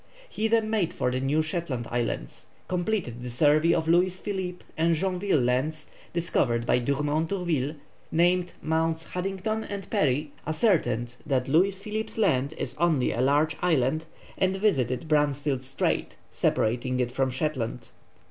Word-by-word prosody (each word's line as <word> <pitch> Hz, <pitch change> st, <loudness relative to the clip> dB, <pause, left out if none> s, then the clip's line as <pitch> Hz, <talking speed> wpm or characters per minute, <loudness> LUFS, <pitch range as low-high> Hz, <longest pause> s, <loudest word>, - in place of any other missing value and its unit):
He 220 Hz, -, -1 dB
then 225 Hz, -1 st, +2 dB
made 205 Hz, -7 st, +1 dB
for 125 Hz, -, 0 dB
the 130 Hz, -, -1 dB
New 145 Hz, +4 st, +1 dB
Shetland 155 Hz, -7 st, -3 dB
Islands, 120 Hz, -, -3 dB, 0.2 s
completed 180 Hz, -, -2 dB
the 125 Hz, -, -5 dB
survey 150 Hz, +6 st, +4 dB
of 160 Hz, -1 st, -1 dB
Louis 180 Hz, +2 st, +3 dB
Philippe 185 Hz, -3 st, -4 dB
and 165 Hz, +1 st, +2 dB
Joinville 180 Hz, -5 st, +1 dB
Lands, 150 Hz, +6 st, 0 dB, 0.2 s
discovered 120 Hz, -9 st, +1 dB
by 125 Hz, -, +3 dB
Dumont 150 Hz, +5 st, 0 dB
d'Urville, 165 Hz, -7 st, -1 dB, 0.4 s
named 175 Hz, +2 st, +2 dB
Mts. 160 Hz, +1 st, 0 dB
Haddington 195 Hz, +4 st, -2 dB
and 200 Hz, -2 st, -6 dB
Parry, 145 Hz, +1 st, +1 dB, 0.2 s
ascertained 125 Hz, -, +1 dB
that 130 Hz, -3 st, +1 dB
Louis 185 Hz, +7 st, +3 dB
Philippe's 215 Hz, +2 st, -4 dB
Land 150 Hz, -, +2 dB
is -, -, -4 dB
only 160 Hz, -7 st, +2 dB
a 120 Hz, -, -1 dB
large 145 Hz, +4 st, +3 dB
island, 155 Hz, -2 st, +1 dB, 0.3 s
and 190 Hz, 0 st, +2 dB
visited 155 Hz, -, +1 dB
Bransfield 145 Hz, -3 st, +1 dB
Strait, 135 Hz, +1 st, -1 dB, 0.2 s
separating 125 Hz, +3 st, 0 dB
it 125 Hz, -1 st, 0 dB
from 135 Hz, +1 st, +1 dB
Shetland. 130 Hz, -4 st, -3 dB
155 Hz, 145 wpm, -27 LUFS, 130-180 Hz, 0.4 s, survey